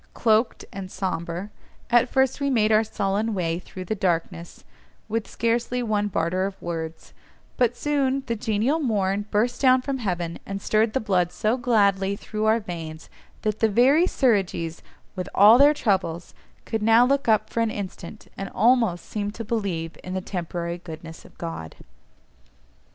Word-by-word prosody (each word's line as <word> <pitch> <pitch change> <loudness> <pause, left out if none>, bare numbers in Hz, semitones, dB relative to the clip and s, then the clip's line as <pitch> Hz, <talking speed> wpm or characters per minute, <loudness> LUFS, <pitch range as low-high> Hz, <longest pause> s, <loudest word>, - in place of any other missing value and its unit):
Cloaked, 225 +1 +2
and 190 -1 -6
sombre, 180 +1 -4 0.4
at 240 +1 +4
first 265 +1 +1
we 280 - +1
made 220 -4 +2
our 215 +1 +5
sullen 210 +1 -1
way 170 -2 -1
through 185 0 -9
the 200 - -1
darkness, 175 -3 -2 0.4
with 220 -1 -3
scarcely 240 +2 -1
one 210 -2 0
barter 185 0 0
of 195 - -9
words, 165 -1 -6 0.4
but 245 -1 +1
soon 275 -2 0
the 235 - -2
genial 225 +8 0
morn 205 -7 0
burst 225 +4 0
down 260 -1 +6
from 275 -1 -3
heaven, 175 -6 -3
and 195 0 -5
stirred 215 +2 +1
the - - +1
blood 185 -6 +1
so 215 +6 0
gladly 200 -6 +2
through 215 +1 -4
our 220 +1 +4
veins, 165 -5 -8 0.3
that 215 0 -1
the 225 - +3
very 270 - +4
Suridgees, 190 - 0 0.3
with 185 -1 -4
all 215 +5 +8
their 285 +1 +8
troubles, 190 - -1 0.3
could 225 -1 -2
now 225 +3 +6
look 275 +1 +1
up 215 -1 +2
for - - -2
an 230 -1 +2
instant, 200 -1 -7
and 195 - -5
almost 225 -5 +3
seem 205 -1 -3
to 225 +2 -7
believe 185 -7 -3
in 185 0 -5
the - - 0
temporary 175 -2 -4
goodness 160 -1 -10
of - - -18
God. 165 - -6
210 Hz, 165 wpm, -24 LUFS, 180-235 Hz, 0.4 s, all